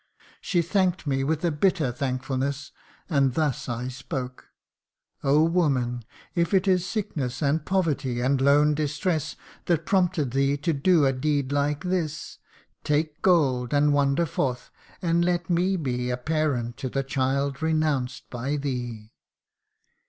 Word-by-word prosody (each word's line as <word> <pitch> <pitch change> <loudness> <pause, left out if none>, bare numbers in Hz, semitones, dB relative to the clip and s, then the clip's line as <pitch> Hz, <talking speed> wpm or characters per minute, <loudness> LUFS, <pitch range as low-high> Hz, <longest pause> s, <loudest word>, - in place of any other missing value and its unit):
She 175 -3 +1
thank'd 185 0 0
me 135 -2 0
with 160 +4 -1
a 170 - +2
bitter 155 -3 +1
thankfulness, 135 +2 -3 0.4
And 140 -6 +2
thus 150 -5 -1
I 120 +1 -3
spoke: 130 0 -6 0.4
' - - -45
Oh! 145 +3 +4
woman, 135 -8 +1 0.3
if 170 +3 +1
it 190 +1 +2
is 185 -1 +2
Sickness 155 - -3
and 145 +3 +1
poverty, 150 -10 0
and 130 +2 +1
lone 145 +2 +4
distress, 155 +2 -1 0.3
That 165 -2 +1
prompted 180 -8 +1
thee 140 +2 +1
to 160 +3 -1
do 155 +1 +3
a 135 - +3
deed 140 0 -1
like 145 +1 0
this, 175 -4 -3 0.4
Take 150 +1 -1
gold, 135 -8 +2
and 145 0 +4
wander 140 +3 +2
forth, 125 -5 -2 0.3
and 170 0 +2
let 175 0 0
me 180 +3 +2
be 125 -5 -2
A 125 - -1
parent 130 -4 -1
to 130 - -4
the 135 +2 -1
child 135 +1 -1
renounced 155 -5 0
by 130 +4 -2
thee 120 -6 -4
145 Hz, 145 wpm, -25 LUFS, 130-165 Hz, 0.4 s, Oh